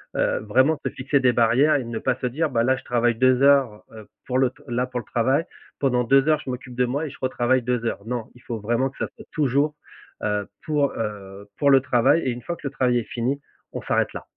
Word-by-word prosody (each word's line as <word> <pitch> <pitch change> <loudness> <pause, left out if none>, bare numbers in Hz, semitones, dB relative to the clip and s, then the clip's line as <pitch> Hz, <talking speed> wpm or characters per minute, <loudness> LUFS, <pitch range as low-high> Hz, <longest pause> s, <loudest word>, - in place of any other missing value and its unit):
heu, - - +1
vraiment 130 +9 +2
se - - +1
fixer 135 +2 0
des 125 -2 +3
barrières 120 +6 +4
et 140 - 0
ne 115 -1 -5
pas 130 +2 0
se 125 - 0
dire: 155 +6 -1
«Bah, 115 -3 +1
là, 130 +2 +3
je - - -11
travaille 120 -1 +1
2 130 +2 +3
heures, 135 -6 +4
heu, 110 -2 -12 0.2
pour 130 0 -1
le 130 -1 +3
t - - -22
là, 120 0 0
pour 125 -1 -4
le 120 - -9
travail, 130 +8 +1 0.4
pendant 125 -3 +1
2 135 +4 +4
heures 155 -1 +3
je - - -5
m'occupe 125 0 -6
de 125 0 +2
moi 140 +6 -2
et - - -5
je - - -13
retravaille 130 0 +1
2 120 -1 -1
heures». 105 -3 -3
Non, 120 -1 -3
il 125 - -17
faut 115 -2 -5
vraiment 120 +5 0
que 135 - -20
ça - - -2
soit - - -13
toujours, 145 +1 +1 0.5
heu, 105 -1 -1 0.2
pour, 145 -2 +1
heu, 100 -2 -6
pour 140 - +3
le 135 -1 +6
travail 125 +5 +3
et - - 0
une 120 +1 -6
fois 170 - -4
que 150 - -6
le - - -5
travail 125 -3 +1
est - - -4
fini, 125 +6 -3 0.3
on - - -4
s'arrête - - 0
là. - - -7
125 Hz, 260 wpm, -23 LUFS, 120-135 Hz, 0.5 s, le